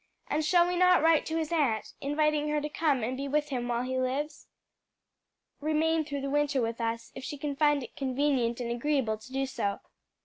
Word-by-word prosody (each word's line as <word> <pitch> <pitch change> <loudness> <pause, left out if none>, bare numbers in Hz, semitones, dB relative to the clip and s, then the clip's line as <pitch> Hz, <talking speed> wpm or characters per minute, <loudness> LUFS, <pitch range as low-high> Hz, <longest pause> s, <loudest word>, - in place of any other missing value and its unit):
And 305 +1 +1
shall 345 +3 +4
we 360 - -1
not 365 -2 +5
write 325 -2 +4
to 320 - -1
his 320 -1 -2
aunt, 275 -10 0
inviting 300 +1 +1
her 300 0 +1
to 300 +1 -4
come 295 -5 +1
and 250 +4 -1
be 275 +2 -4
with 295 +1 0
him 245 -3 -2
while 240 0 0
he 260 0 -2
lives? 280 +4 -2 1.1
remain 315 +1 +1
through 285 -2 -4
the 275 - -3
winter 290 -1 +1
with 230 0 -2
us, 230 0 -3
if - - -8
she 290 - -5
can 285 0 -3
find 295 -1 +3
it - - -11
convenient 260 -3 0
and 235 -1 -3
agreeable 240 -3 0
to 235 +4 -14
do 270 0 0
so?" 200 -6 -2
285 Hz, 210 wpm, -29 LUFS, 250-300 Hz, 1.1 s, not